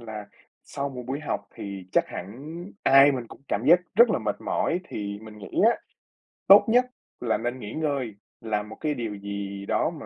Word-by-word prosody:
là 110 -3 -7 0.4
sau 140 0 -4
một 130 -2 -7
buổi 140 +3 -3
học 145 - -2
thì 100 -2 -7
chắc - - +4
hẳn 130 - -8 0.3
ai 135 +1 +7
mình 125 -3 -4
cũng - - -13
cảm 105 +4 -1
giác 175 +4 +7
rất 235 +3 +7
là 190 - +2
mệt 105 -3 -2
mỏi 175 - 0
thì 100 -1 -4
mình 110 -1 -11
nghĩ 100 - -9 0.2
á, - - -5 0.7
tốt 200 +2 +9
nhất 245 +3 +4 0.4
là 115 -2 +1
nên 120 +2 -3
nghỉ 105 -1 -7
ngơi, 140 -9 -2 0.3
làm 105 -2 -2
một 110 - -8
cái 150 -1 0
điều 115 -5 -4
gì 100 0 -5
đó - - +1
mà - - -9
115 Hz, 205 wpm, -26 LUFS, 105-145 Hz, 0.7 s, tốt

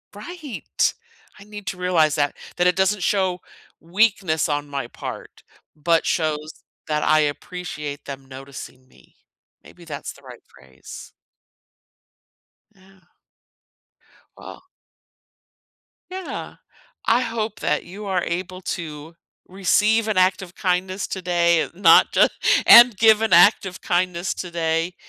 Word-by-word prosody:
Right. 320 -9 -3 0.5
I - - -12
need 210 -1 -10
to 180 - -4
realize 170 -5 +2
that 145 -2 0 0.2
that 175 - +3
it 180 - +2
doesn't 190 +1 +1
show 185 -1 0 0.4
weakness 185 -3 +1
on 145 0 -2
my 140 -4 -5
part, - - -9 0.3
but 165 +2 +1
shows 155 -1 -2 0.2
that 150 -1 -1
I 155 - +4
appreciate 150 -1 -5
them 135 -1 -8
noticing 130 -1 -11
me. - - -24 0.5
Maybe 175 -1 -16
that's 145 -3 -7
the - - -17
right - - -13
phrase. 65 -1 -14 1.6
Yeah. 190 0 -23 1.3
Well - - -12 1.5
Yeah, 375 -1 -7 0.5
I 235 +3 +3
hope 225 -3 -4
that - - -1
you 200 +4 -9
are 190 -3 -1
able 185 +2 -4
to 160 -2 -7 0.3
receive 210 +4 +1
an 210 - -1
act 185 +1 +3
of 180 -1 -11
kindness 185 +1 -1
today, 175 -3 +1
not 170 -2 +5
ju - - +5 0.4
and 235 -4 +9
give 220 0 +5
an 225 - 0
act 180 +5 +6
of 190 -1 -7
kindness 180 0 -1
today, 170 0 -2
180 Hz, 125 wpm, -22 LUFS, 155-195 Hz, 1.6 s, and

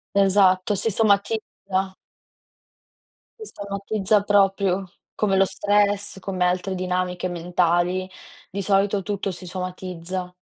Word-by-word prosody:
Esatto. 195 0 +4
Si 210 +3 +1
somatizza. 200 -2 0 1.5
Si 435 - -8
somatizza 200 0 0
proprio, 195 -2 +2 0.2
come 195 -2 +1
lo 195 - +5
stress, 205 0 +1
come 185 -1 -2
altre 180 +2 0
dinamiche 180 0 -2
mentali. 175 +1 0 0.4
Di 200 +1 -3
solito 195 0 +1
tutto 200 0 -2
si 180 +1 -8
somatizza. 180 0 -5
190 Hz, 105 wpm, -23 LUFS, 180-200 Hz, 1.5 s, lo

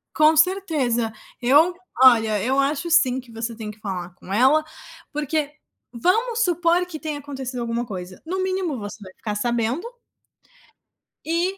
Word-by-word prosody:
Com 310 0 +5
certeza, 305 - +2 0.3
eu 290 +8 +5 0.3
olha, 220 -5 +6
eu 265 +3 +1
acho 285 +4 0
sim 260 -6 +4
que 250 -2 -13
você 225 +1 -4
tem 215 -1 -6
que 215 - -17
falar 180 -4 -5
com 185 - -12
ela. 265 +8 +4 0.5
porque. 300 0 -1 0.4
vamos 450 - +1
supor 350 -1 +2
que 340 -3 -8
tenha 305 -2 -4
acontecido 265 -3 -6
alguma 235 +1 -2
coisa, 185 -4 -8
no 375 +3 -2
mínimo, 370 -6 -1
você 205 0 -7
vai 185 -2 -11
ficar 210 +1 -5
sabendo 240 - -1 1.4
e 345 +4 0
270 Hz, 150 wpm, -23 LUFS, 230-335 Hz, 1.4 s, olha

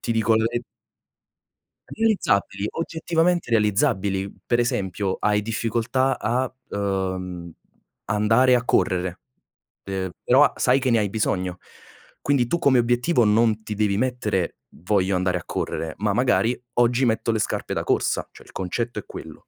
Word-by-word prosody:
ti 115 - -2
dico 115 0 +2
le 110 - +1 1.5
realizzabili, 190 - +1
oggettivamente 165 -1 0
realizzabili. 105 -3 +1 0.2
Per 120 - +1
esempio: 100 -6 -1
hai 105 0 +2
difficoltà 115 +4 -1
a, 125 +3 -1 0.2
uhm, 95 -3 -3 0.6
andare 115 +5 +3
a 125 - 0
correre, 90 -3 0 0.6
ehm, 95 -1 -3
però 135 +4 +5
sai 130 +2 +3
che 130 -1 0
ne 115 - +4
hai 105 - 0
bisogno. 95 -4 -1 0.6
Quindi 140 -4 +1
tu 170 - 0
come 135 -6 +4
obiettivo 120 +3 +2
non 110 +1 +2
ti 110 - -5
devi 105 -1 +1
mettere: 110 -7 -1
"Voglio 95 +1 0
andare 90 0 0
a - - -7
correre." 80 -1 -3
Ma 105 -1 +1
magari: 125 +1 +2
"Oggi 120 +2 +2
metto 115 0 +1
le 110 - 0
scarpe - - -2
da - - -2
corsa." - - 0
Cioè, - - -15
il - - -18
concetto 115 +6 -3
è - - -10
quello. - - -11
110 Hz, 145 wpm, -23 LUFS, 100-125 Hz, 1.5 s, però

